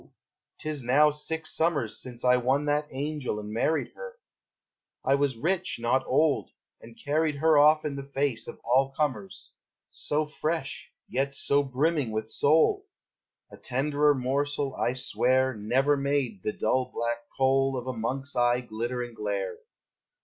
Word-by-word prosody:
'T - - -8
is 150 -2 -3
now 145 +5 +4
six 160 +2 -2
summers 150 -9 0
Since 125 -1 -5
I 125 0 +5
won 130 +4 +1
that 150 0 0
angel 140 -4 -3
and 105 0 -7
married 155 +8 0
her: 485 -1 -9 0.9
I 135 - +3
was 140 -3 +1
rich, 180 +8 0
not 125 +3 +1
old, 150 +2 +2 0.3
and 115 0 -14
carried 155 +1 0
her 160 +2 +3
Off 155 +1 +5
in 145 -2 -2
the 140 - -5
face 140 -3 -2
of - - -9
all 130 +3 +3
comers. 135 -8 -4 0.4
So 150 +1 -1
fresh, 155 -1 -4 0.2
yet 140 +2 -1
so 140 +1 +2
brimming 140 0 0
with 110 0 -4
soul! 160 - +3 0.6
A - - -12
tenderer 145 +3 +1
morsel, 140 +2 -1
I 120 - 0
swear, 130 0 +2
Never 125 +7 +1
made 140 -7 -1
the 105 - -2
dull 130 +4 0
black 120 0 -2 0.2
coal 135 0 +2
Of 125 - -5
a 130 - -3
monk's 135 +5 -3
eye 120 0 +2
glitter 120 +1 -4
and 120 -1 -9
glare. 100 -4 -3
135 Hz, 155 wpm, -27 LUFS, 125-150 Hz, 0.9 s, I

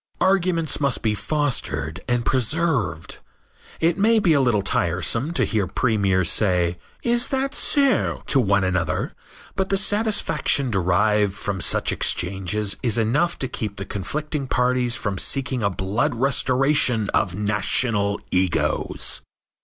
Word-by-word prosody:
Arguments 180 -4 +1
must 140 -4 0
be 110 -2 +1
fostered 105 - -2
and 120 -1 0
preserved. 130 - -1 0.6
It 165 +3 +1
may 225 +3 +4
be 185 -7 +3
a 140 - +3
little 115 -6 +1
tiresome 100 - 0
to - - +1
hear 105 -5 -1
premiers 100 -5 +1
saying, 90 -4 +1 0.3
"Is 240 0 +1
that 270 +1 -1
so?" 280 -6 +1
to 140 - +2
one 100 -4 +2
another, 90 -4 -1 0.4
but 190 0 -1
the 195 - +2
satisfaction 205 - 0
derived 100 +2 +2
from 100 -2 -4
such - - +1
exchanges 95 +3 -1
is 120 -4 +1
enough 140 +10 +1
to 135 - -2
keep 105 -4 -5
the 100 - -5
conflicting 145 - -4
parties 125 -1 +1
from 100 -5 -3
seeking 130 -2 +1
a 100 - +1
blood 105 - -1
restoration 130 -2 +2
of 90 -4 0
national 105 0 +1
egos. 90 -1 0
115 Hz, 135 wpm, -22 LUFS, 100-150 Hz, 0.6 s, may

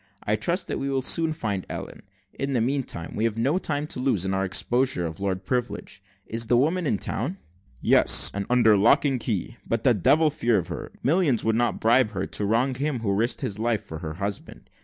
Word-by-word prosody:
I 105 - +1
trust 170 - -1
we 135 - -2
shall 135 -1 -1
soon 165 +4 +2
find 105 - -3
Ellen: - - -7 0.3
in 135 0 -3
the 125 - +2
meanwhile, 120 - -2
we 110 - -2
have 115 -1 -1
no 140 +10 +1
time 145 -4 -2
to 150 - -5
lose, 125 -8 +1
in 95 - -1
our 95 0 0
exposure 120 +1 0
of 80 +3 -6
Lord 95 -1 -3
Privilege. 125 +2 -3 0.2
Is 115 0 -2
the 120 - +3
woman 160 +6 +1
in 105 - +1
town?" - - -3 0.4
"Yes, - - +5
and 100 0 -4
under 120 -3 +5
lock 105 +8 +4
and 135 -3 +1
key; 115 +1 -3
but 115 0 -1
the 125 - +5
devil 145 - +3
a - - +5
fear 120 -6 +1
of 85 -4 -3
her. - - -6
Millions 150 - +2
would 110 0 +1
not 115 -4 0
bribe 115 -1 +3
her 95 -1 -2
to 105 - -3
wrong 115 +6 +1
him 135 -1 -2
who 100 -3 0
risked 115 +5 0
his 100 0 -3
life 115 -2 0
for 80 - -8
her 80 -2 -6
husband. 100 +2 -6
115 Hz, 220 wpm, -25 LUFS, 100-135 Hz, 0.4 s, Yes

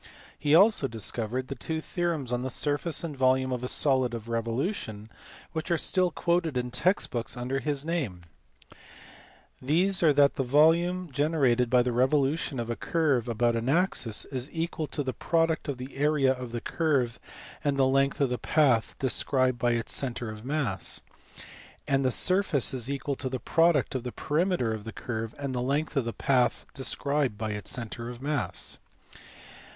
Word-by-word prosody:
He 150 +1 +3
also 195 -5 +5
discovered 115 +2 -2
the 135 - -4
two 160 +5 -3
theorems 160 -6 -2
on 125 - 0
the 130 - -3
surface 145 +5 -1
and 160 -4 -4
volume 130 0 +2
of 125 -1 -2
a - - -1
solid 130 -3 +2
of 115 0 -8
revolution 115 - -3 0.4
which 160 +1 -4
are 170 - +2
still 185 +2 +1
quoted 170 -5 0
in 125 0 -2
text 185 +10 +1
books 120 +1 -3
under 125 +2 -2
his 145 0 -2
name: 135 - -2 1.4
these 180 +8 +2
are 160 -3 +6
that 140 -1 +4
the 135 - +1
volume 165 +6 +3
generated 135 -4 +2
by 125 0 +4
the 125 - -1
revolution 135 +3 +1
of 115 - -3
a 120 - -2
curve 145 -8 0
about 120 +1 +1
an 115 +2 -1
axis 140 - +1
is 130 0 -4
equal 165 -1 -3
to 145 - -2
the 130 -1 -3
product 165 -1 0
of 140 -3 -3
the 130 +2 -8
area 140 -2 +3
of 125 -2 -7
the 120 0 -4
curve 135 -9 0 0.4
and 145 -1 +1
the 135 - +4
length 135 +1 +2
of 140 -3 +2
the 125 - -1
path 130 -5 +2
described 130 -1 +1
by 120 +1 +2
its 115 -1 -2
centre 120 -4 -2
of 110 0 -10
mass; 130 - -1 0.9
and 135 0 +2
the 130 - +3
surface 180 - +2
is 125 -1 -2
equal 140 0 -2
to 130 -1 -3
the 130 - -2
product 165 -3 +2
of 130 - -2
the 125 0 -5
perimeter 155 -6 0
of 110 -1 -6
the 115 - -7
curve 115 -1 -5
and 140 -2 -4
the 125 - -1
length 145 +6 -1
of 135 -4 +1
the 115 - -2
path 125 -1 +1
described 140 -2 -1
by 110 0 -3
its 105 0 -4
centre 115 0 -4
of 120 -1 -8
mass. 145 0 -2
135 Hz, 180 wpm, -28 LUFS, 120-155 Hz, 1.4 s, are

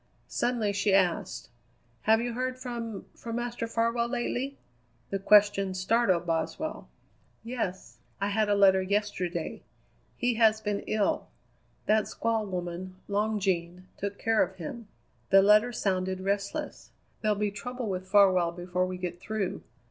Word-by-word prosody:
Suddenly 230 -4 0
she 200 -1 +2
asked: 185 -5 0 0.5
"Have 220 +1 +5
you 240 0 -2
heard 255 +1 -2
from 235 -4 -5
from 230 -1 -6
Master 240 -1 -3
Farwell 230 +1 +1
lately?" 250 +3 -2 0.5
The 195 - -1
question 200 -1 +4
startled 185 -2 +2
Boswell. 170 - -2 0.5
"Yes. 190 - -4 0.2
I 200 +1 0
had 210 +1 +1
a 205 - +4
letter 190 -1 +5
yesterday. 185 -4 -2 0.6
He 245 -1 +1
has 220 -1 +5
been 205 -2 -2
ill. 215 -2 0 0.6
That 215 0 +3
squaw 225 -2 -1
woman, 180 0 -5
Long 210 +1 0
Jean, 180 -2 -1
took 200 0 -4
care 225 -1 +2
of 190 - 0
him. 195 +6 -7 0.4
The 195 0 +7
letter 210 +4 +5
sounded 185 -4 -1
restless. 200 +1 -3 0.3
There'll 215 -1 +2
be 210 0 0
trouble 245 +3 -5
with 185 -1 -3
Farwell 185 -4 +5
before 180 +1 -2
we 185 0 -4
get 180 -1 -5
through. 210 -1 -3
205 Hz, 140 wpm, -29 LUFS, 185-230 Hz, 0.6 s, The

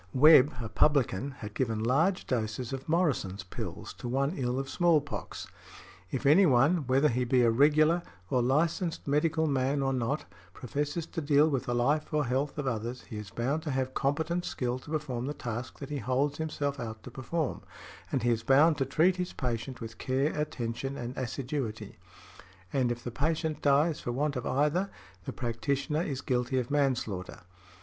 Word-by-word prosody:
Webb, 150 +1 +7
a 115 - -4
publican, 135 0 +2
had 105 -6 -9
given 110 -4 -1
large 160 +11 +2
doses 115 +1 -2
of 135 +3 -6
Morrison's 140 - 0
pills 95 - -7
to - - -5
one 135 +5 0
ill 125 -2 -1
of 135 0 -2
small 170 +1 +3
pox. 145 0 -6 0.6
"If 135 +1 -3
any 170 +7 +6
one, 140 +3 +3
whether 135 +3 +4
he 125 -1 0
be 125 0 +3
a 115 - +4
regular 155 +7 +4 0.3
or 125 +5 +1
licensed 160 +7 0
medical 160 +3 +2
man 140 -1 +1
or 135 0 +1
not, 130 +4 -1 0.3
professes 145 - -3
to 165 - -5
deal 145 +1 +4
with 135 -5 -1
the 120 - -1
life 145 +6 +1
or 150 -1 +1
health 135 +5 -1
of 145 - -2
others, 120 0 -3
he 110 - -8
is 105 -2 -7
bound 135 +9 -1
to 155 - -5
have 130 -1 -1
competent 160 +5 0
skill 125 -4 -2
to 140 - -14
perform 140 -5 -2
the 145 - -3
task 120 0 -5
that 140 0 -8
he 145 - -2
holds 135 +5 0
himself 145 -3 -2
out 110 -2 -6
to 125 - -9
perform, 140 +4 -3 0.5
and 130 - 0
he 120 - +3
is 115 -1 0
bound 145 +6 +4
to 135 - +2
treat 175 +7 +3
his 180 0 -3
patient 125 +1 -4
with 115 0 -8
care, 135 +4 0
attention 135 -2 -3
and 120 +2 -5
assiduity;" 130 -2 -4 0.7
and 125 -3 +2
if 120 0 -5
the 120 - -4
patient 155 +3 -1
dies 145 +3 +3
for 120 - -3
want 145 +3 -1
of 125 - -3
either, 150 +8 +1 0.4
the - - -3
practitioner 140 +5 -1
is 140 -5 -3
guilty 125 0 0
of 125 +1 -2
manslaughter. 130 -10 -1
135 Hz, 185 wpm, -29 LUFS, 120-150 Hz, 0.7 s, Webb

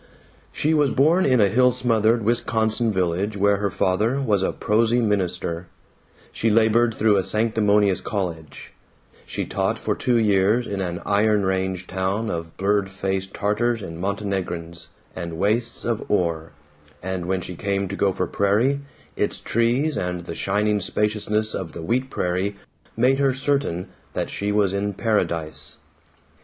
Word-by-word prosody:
She 155 +2 0
was 150 -3 +3
born 160 +9 +3
in 130 -2 +4
a 100 - +5
hill 125 +5 +4
smothered 115 -2 +2
Wisconsin 110 0 +1
village 95 +2 -1
where 100 +1 +3
her 100 0 -1
father 105 +8 +1
was 105 -8 +1
a - - +1
prosy 115 +3 +1
minister; 90 -5 -1 0.6
she 115 - 0
labored 115 +1 +3
through 105 -2 +3
a 95 - +2
sanctimonious 105 -1 +2
college; 85 -7 -5 0.5
she - - -3
taught - - -1
for - - -1
two 125 -2 +1
years 105 +2 +3
in 100 -3 -3
an 90 -1 -4
iron 105 0 +2
range 95 -1 -1
town 95 +5 -2
of 85 -1 -6
blurry 100 0 +1
faced 95 0 -3
Tatars 110 +2 0
and 80 -3 -7
Montenegrins, 95 -4 -3 0.3
and 85 -2 -5
wastes 110 +6 -1
of 115 -2 -1
ore, 85 -5 0 0.5
and 95 -2 -3
when 95 0 0
she 90 - -5
came 100 +1 -1
to - - -5
Gopher 95 -2 0
Prairie, 110 +10 +1 0.4
its - - -1
trees 125 +7 +1
and 90 -1 -3
the 85 - -5
shining 105 +3 0
spaciousness 105 +2 0
of 90 -4 -5
the 85 - -7
wheat 125 +8 0
prairie 95 +1 -1 0.4
made 130 +3 +3
her 135 -2 +2
certain 135 -10 0 0.3
that - - -3
she 100 +1 -2
was 100 -2 +2
in 100 +1 -1
paradise. 80 - -1
100 Hz, 150 wpm, -23 LUFS, 95-115 Hz, 0.6 s, a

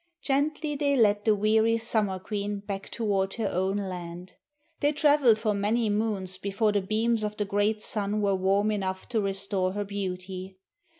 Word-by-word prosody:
Gently 295 +2 0
they 285 -1 +1
led 205 -3 +3
the 215 -2 +4
weary 220 +2 +3
Summer 220 -4 +1
Queen 205 +1 -4
back 200 -1 -6
toward 195 -4 -1
her 220 -4 -1
own 190 +2 0
land. 180 -2 -6 0.5
They 290 +1 +2
travelled 290 -6 +4
for 215 -1 0
many 210 +2 +1
moons 205 -3 -1
before 200 +2 0
the 205 -1 +1
beams 220 +3 0
of 210 0 -3
the 210 - 0
great 205 +2 0
sun 210 0 -1
were 200 -1 +2
warm 195 +3 +2
enough 190 -2 -3
to 230 -3 +1
restore 195 -1 0
her 205 +1 -2
beauty. 190 -1 -5
205 Hz, 170 wpm, -27 LUFS, 195-220 Hz, 0.5 s, the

